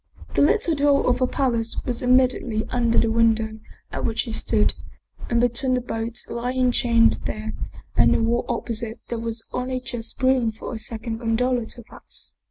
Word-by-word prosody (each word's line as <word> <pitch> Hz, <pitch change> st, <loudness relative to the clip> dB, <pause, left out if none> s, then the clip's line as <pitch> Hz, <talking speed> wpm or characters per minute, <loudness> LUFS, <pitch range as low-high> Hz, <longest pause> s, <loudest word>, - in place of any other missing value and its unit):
The -, -, +2 dB
little 335 Hz, +4 st, +3 dB
door 285 Hz, -1 st, +3 dB
of 250 Hz, 0 st, +2 dB
the 255 Hz, -, +3 dB
palace 235 Hz, -4 st, 0 dB
was 245 Hz, -2 st, -2 dB
immediately 250 Hz, -3 st, +2 dB
under 235 Hz, -2 st, +1 dB
the 230 Hz, -, +4 dB
window 225 Hz, -1 st, +2 dB, 0.3 s
at -, -, -4 dB
which 225 Hz, -1 st, 0 dB
he 235 Hz, -, -6 dB
stood, -, -, +2 dB, 0.6 s
and 235 Hz, -, +2 dB
between 245 Hz, +2 st, +1 dB
the -, -, +1 dB
boat 235 Hz, -1 st, -2 dB
lying 250 Hz, +1 st, 0 dB
chained 230 Hz, -1 st, +4 dB
there 215 Hz, +1 st, -4 dB, 0.4 s
and -, -, +5 dB
the -, -, +2 dB
wall 235 Hz, +1 st, +1 dB
opposite 230 Hz, -1 st, -3 dB
there 235 Hz, -, -2 dB
was 225 Hz, 0 st, -4 dB
only 255 Hz, 0 st, -2 dB
just 240 Hz, -2 st, -6 dB
room 255 Hz, -3 st, +3 dB
for 220 Hz, -, -7 dB
a 225 Hz, -, -4 dB
second 225 Hz, 0 st, -3 dB
gondola 240 Hz, +1 st, 0 dB
to 240 Hz, -, -5 dB
pass. -, -, -6 dB
235 Hz, 180 wpm, -23 LUFS, 225-250 Hz, 0.6 s, and